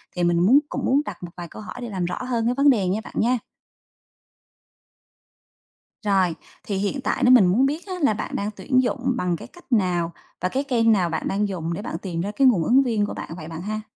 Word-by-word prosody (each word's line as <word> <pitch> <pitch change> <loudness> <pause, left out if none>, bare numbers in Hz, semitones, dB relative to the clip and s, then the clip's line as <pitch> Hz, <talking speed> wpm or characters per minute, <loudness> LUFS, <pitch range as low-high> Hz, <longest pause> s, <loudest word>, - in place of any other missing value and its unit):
thì 180 - -1
mình 175 0 +3
muốn 230 +11 +6
cũng - - -3
muốn 275 +3 +3
đặt - - -7
một 175 - -7
vài 175 - -6
câu 170 - -10
hỏi 210 - -8
để 240 - -5
làm 185 -4 -2
rõ 180 +1 -3
hơn 235 -3 -1
cái 240 - +2
vấn 280 +2 +5
đề 210 -9 +3
nha 195 +4 0
bạn - - -11
nha. 245 +2 +2 2.7
Rồi, 190 -4 +2 0.3
thì 200 -2 -3
hiện 205 +8 -2
tại - - -1
nếu 250 - +6
mình 240 -7 +8
muốn 230 +10 +3
biết 300 +5 -2
á 375 - -4
là 280 -7 +4
bạn 210 - -5
đang 205 +1 -2
tuyển 255 +4 +1
dụng 255 +1 -1
bằng 180 -5 0
cái - - -9
cách 350 -6 -19
nào? 180 -6 +1 0.3
Và 185 - 0
cái 270 +6 -1
kênh 235 -5 +2
nào 185 -5 +2
bạn 160 - -2
đang 205 +1 0
dùng 170 -4 -3
để 200 - -4
bạn 210 - -4
tìm 170 -2 -4
ra 200 +3 -3
cái 270 +5 +3
nguồn 200 -10 +4
ứng 260 +9 +4
viên 225 -5 +1
của - - -5
bạn - - -7
vậy 155 - -8
bạn 165 0 -7
ha? 215 +3 -3
210 Hz, 250 wpm, -23 LUFS, 180-250 Hz, 2.7 s, mình